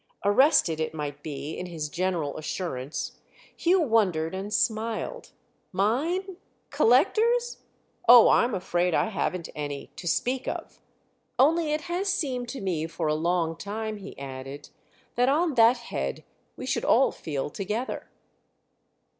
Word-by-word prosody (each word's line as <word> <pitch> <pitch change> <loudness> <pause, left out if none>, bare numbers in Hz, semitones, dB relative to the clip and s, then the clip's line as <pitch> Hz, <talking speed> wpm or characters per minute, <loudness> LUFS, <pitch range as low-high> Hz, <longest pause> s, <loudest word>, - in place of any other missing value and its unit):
Arrested, 205 - +4
it 160 0 -2
might 145 -2 -5
be, 145 -1 -5
in 180 - -5
his 160 -3 -4
general 170 -3 -2
assurance, 150 -4 -4 0.4
Hugh 360 +2 +3
wondered 190 - +2
and 195 +2 -5
smiled. 225 - -1 0.4
"Mine—collectors? 365 - +1 0.5
Oh, 240 -2 +10
I'm 235 -3 +3
afraid 180 -2 0
I - - +2
haven't 180 -4 -2
any—to 145 +4 -6
speak 250 +8 0
of. - - -5 0.6
Only 310 +4 +3
it 305 +1 0
has 365 +4 -1
seemed 255 -8 -2
to 265 - -6
me 170 -5 -1
for 165 0 -4
a - - +2
long 165 +1 0
time," 215 +2 -4
he 200 -1 -10
added, 135 +1 -8 0.4
"that 245 +2 +2
on 315 +3 +2
that 235 0 +6
head 70 - -4 0.3
we - - -6
should - - -1
all - - +4
feel 145 -2 -4
together." 210 - -4
200 Hz, 130 wpm, -27 LUFS, 160-260 Hz, 0.6 s, Oh